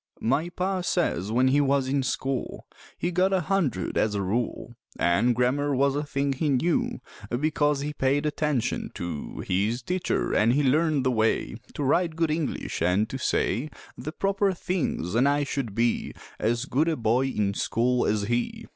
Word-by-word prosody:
My 140 Hz, +8 st, 0 dB
Pa 185 Hz, +1 st, -1 dB
says 155 Hz, -, 0 dB
when 130 Hz, +3 st, +3 dB
he 145 Hz, +2 st, +4 dB
was 140 Hz, -1 st, +2 dB
in 135 Hz, +1 st, +1 dB
school 130 Hz, +1 st, -3 dB, 0.3 s
He 175 Hz, -, -1 dB
got 185 Hz, +2 st, +2 dB
a 190 Hz, -, +2 dB
hundred 155 Hz, -, 0 dB
as 105 Hz, -1 st, +1 dB
a 100 Hz, -, 0 dB
rule; 120 Hz, +4 st, -2 dB, 0.2 s
An' 105 Hz, +8 st, +3 dB
grammar 135 Hz, +4 st, +1 dB
was 140 Hz, +1 st, +2 dB
a 145 Hz, -, 0 dB
thing 140 Hz, -1 st, -1 dB
he 145 Hz, +3 st, -1 dB
knew 175 Hz, -, +1 dB, 0.3 s
Becoz 145 Hz, +2 st, +1 dB
he 150 Hz, +1 st, -3 dB
paid 140 Hz, +1 st, +1 dB
attention 150 Hz, -4 st, -1 dB
to 85 Hz, -4 st, -5 dB
His 105 Hz, +7 st, 0 dB
teacher, 180 Hz, +5 st, -1 dB
an' 110 Hz, -, +4 dB
he 145 Hz, +2 st, +2 dB
learned 150 Hz, +1 st, +2 dB
the 130 Hz, -, +3 dB
way 110 Hz, -2 st, +1 dB, 0.2 s
To 145 Hz, -, -2 dB
write 165 Hz, +4 st, +2 dB
good 165 Hz, -1 st, +1 dB
English, 155 Hz, -, -3 dB
an' 90 Hz, +5 st, +3 dB
to 135 Hz, -, -6 dB
say 130 Hz, +2 st, 0 dB, 0.3 s
The 130 Hz, +5 st, -6 dB
proper 195 Hz, +2 st, +1 dB
things, 170 Hz, -, -2 dB
an' 125 Hz, +4 st, +4 dB
I 145 Hz, +1 st, +2 dB
should 135 Hz, -7 st, -3 dB
be 115 Hz, +1 st, 0 dB, 0.2 s
As 115 Hz, +2 st, 0 dB
good 150 Hz, +6 st, +1 dB
a 160 Hz, -, +1 dB
boy 120 Hz, +3 st, +2 dB
in 105 Hz, -6 st, 0 dB
school 120 Hz, +4 st, +1 dB
as 105 Hz, -1 st, +1 dB
he. 120 Hz, +3 st, -2 dB
135 Hz, 180 wpm, -26 LUFS, 120-155 Hz, 0.3 s, he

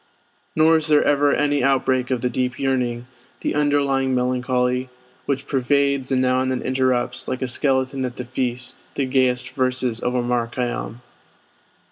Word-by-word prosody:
Nor 160 Hz, +1 st, +5 dB
is 155 Hz, 0 st, -2 dB
there 150 Hz, -1 st, +4 dB
ever 145 Hz, 0 st, +3 dB
any 145 Hz, -2 st, +1 dB
outbreak 130 Hz, -1 st, +1 dB
of 130 Hz, -3 st, -1 dB
the 125 Hz, -, 0 dB
deep 125 Hz, +1 st, -1 dB
yearning, 125 Hz, -3 st, -1 dB, 0.4 s
the -, -, -1 dB
underlying 140 Hz, -3 st, +1 dB
melancholy, 125 Hz, 0 st, 0 dB, 0.4 s
which 140 Hz, 0 st, -1 dB
pervades 140 Hz, 0 st, +1 dB
and 130 Hz, -, +2 dB
now 130 Hz, 0 st, +2 dB
and 130 Hz, -, 0 dB
then 130 Hz, -1 st, -2 dB
interrupts, 130 Hz, -1 st, 0 dB
like 130 Hz, -, -3 dB
a -, -, -1 dB
skeleton 130 Hz, +1 st, 0 dB
at 125 Hz, -1 st, -4 dB
the 125 Hz, -, -5 dB
feast, 125 Hz, 0 st, -4 dB
the 140 Hz, -, 0 dB
gayest 130 Hz, -1 st, +1 dB
verses 130 Hz, -3 st, -1 dB
of 125 Hz, +1 st, -2 dB
Omar 120 Hz, -1 st, 0 dB
Khayyam. 120 Hz, -1 st, -4 dB
130 Hz, 160 wpm, -22 LUFS, 125-135 Hz, 0.4 s, Nor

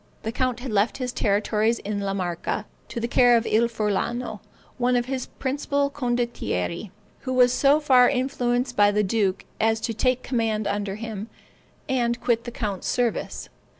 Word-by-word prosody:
The 220 Hz, -, -2 dB
count 250 Hz, 0 st, -1 dB
had 255 Hz, -2 st, -5 dB
left 210 Hz, +2 st, +1 dB
his 250 Hz, -2 st, -3 dB
territories 215 Hz, +2 st, +1 dB
in 205 Hz, 0 st, -4 dB
La 195 Hz, -1 st, -2 dB
Marca 180 Hz, +3 st, -2 dB, 0.2 s
to -, -, -5 dB
the 235 Hz, -, -1 dB
care 245 Hz, 0 st, +5 dB
of 230 Hz, -, -1 dB
Il 230 Hz, +2 st, +3 dB
Furlano, 230 Hz, +2 st, -2 dB, 0.4 s
one 250 Hz, 0 st, +2 dB
of 240 Hz, 0 st, +1 dB
his 260 Hz, -1 st, -3 dB
principal 280 Hz, +1 st, 0 dB
condottieri, 240 Hz, -, -2 dB, 0.3 s
who 260 Hz, -, -4 dB
was 250 Hz, -1 st, +5 dB
so 285 Hz, +3 st, +4 dB
far 255 Hz, -5 st, +5 dB
influenced 250 Hz, -2 st, 0 dB
by 205 Hz, 0 st, +5 dB
the 210 Hz, +1 st, +2 dB
duke 200 Hz, -1 st, 0 dB
as 225 Hz, 0 st, +2 dB
to 230 Hz, +1 st, -2 dB
take 255 Hz, +3 st, +1 dB
command 225 Hz, -4 st, 0 dB
under 200 Hz, -1 st, -2 dB
him, 220 Hz, -1 st, -6 dB, 0.6 s
and 240 Hz, -3 st, 0 dB
quit 235 Hz, -1 st, 0 dB
the 240 Hz, -, -5 dB
count's 205 Hz, -5 st, -4 dB
service. 240 Hz, -2 st, -1 dB
235 Hz, 170 wpm, -24 LUFS, 210-250 Hz, 0.6 s, care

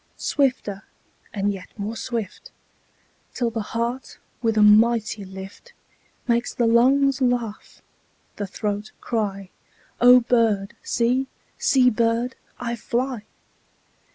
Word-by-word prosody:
Swifter 245 Hz, -8 st, -1 dB, 0.5 s
and 205 Hz, 0 st, -1 dB
yet 185 Hz, -2 st, -9 dB
more 210 Hz, +2 st, -4 dB
swift, 235 Hz, -, -5 dB, 0.8 s
5 -, -, -35 dB
Till 240 Hz, -2 st, 0 dB
the 225 Hz, -1 st, -3 dB
heart 235 Hz, +4 st, -4 dB, 0.2 s
with 225 Hz, -2 st, 0 dB
a 210 Hz, -, +6 dB
mighty 215 Hz, 0 st, +4 dB
lift 190 Hz, -, -11 dB, 0.5 s
Makes 235 Hz, 0 st, 0 dB
the 240 Hz, -, +1 dB
lungs 265 Hz, +4 st, +4 dB
laugh, 245 Hz, -4 st, -2 dB, 0.5 s
the 205 Hz, -, -3 dB
throat 205 Hz, +2 st, -4 dB
cry:— 200 Hz, -5 st, -3 dB, 0.5 s
'O 250 Hz, +1 st, +8 dB
bird, 225 Hz, -3 st, +1 dB
see; 250 Hz, +3 st, 0 dB, 0.3 s
see, 255 Hz, -2 st, +4 dB
bird, 230 Hz, +2 st, 0 dB, 0.3 s
I 235 Hz, -1 st, -3 dB
fly. 240 Hz, 0 st, -3 dB
230 Hz, 115 wpm, -23 LUFS, 210-245 Hz, 0.8 s, O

